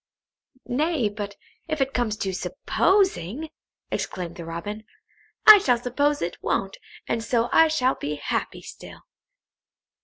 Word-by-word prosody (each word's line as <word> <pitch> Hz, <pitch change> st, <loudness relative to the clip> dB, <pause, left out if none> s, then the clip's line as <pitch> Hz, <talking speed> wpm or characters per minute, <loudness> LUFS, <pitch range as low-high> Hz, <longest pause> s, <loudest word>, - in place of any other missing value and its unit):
"Nay, 285 Hz, -3 st, 0 dB
but 205 Hz, -1 st, -6 dB, 0.3 s
if 310 Hz, -1 st, -2 dB
it 270 Hz, 0 st, 0 dB
comes 220 Hz, -3 st, -1 dB
to 190 Hz, -2 st, -2 dB
supposing," 315 Hz, -, 0 dB, 0.4 s
exclaimed 175 Hz, -2 st, -4 dB
the 170 Hz, -, -8 dB
Robin, 205 Hz, +6 st, -6 dB, 0.6 s
"I 430 Hz, -1 st, +11 dB
shall 250 Hz, -10 st, +2 dB
suppose 285 Hz, +3 st, 0 dB
it 175 Hz, -, -5 dB
won't, 195 Hz, 0 st, -2 dB, 0.3 s
and 230 Hz, -1 st, -1 dB
so 235 Hz, 0 st, 0 dB
I 325 Hz, -, +6 dB
shall 270 Hz, -5 st, +1 dB
be 150 Hz, +1 st, -4 dB
happy 145 Hz, -, -3 dB
still." -, -, -12 dB
240 Hz, 130 wpm, -24 LUFS, 195-295 Hz, 0.6 s, I